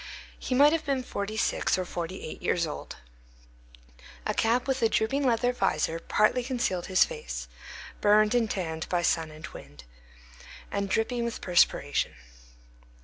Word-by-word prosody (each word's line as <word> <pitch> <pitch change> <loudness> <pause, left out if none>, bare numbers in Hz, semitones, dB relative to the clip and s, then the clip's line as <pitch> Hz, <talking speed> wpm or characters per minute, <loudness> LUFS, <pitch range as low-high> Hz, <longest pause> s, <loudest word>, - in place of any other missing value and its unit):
He 255 - -2
might 290 +3 +6
have 330 - 0
been 275 -3 -1
forty 215 -2 -4
six 220 - +1
or 185 - -2
forty 175 +2 -5
eight - - -7
years 170 -1 +1
old. 150 - -7 1.3
A - - 0
cap 240 +4 +1
with 265 0 0
a 225 - +4
drooping 250 +6 +1
leather 245 -1 +2
visor 190 -6 0
partly 215 +8 +2
concealed 240 -8 -1
his 185 -1 +5
face, 470 -1 -6 0.5
burned 210 +1 +5
and 235 -3 +2
tanned 160 -4 -3
by 175 -1 0
sun 165 -2 +1
and 155 +1 -10
wind, 70 -1 -12 0.9
and 200 -1 -2
dripping 235 +4 0
with 235 -1 -3
perspiration. 175 -1 +2
215 Hz, 150 wpm, -28 LUFS, 175-245 Hz, 1.3 s, might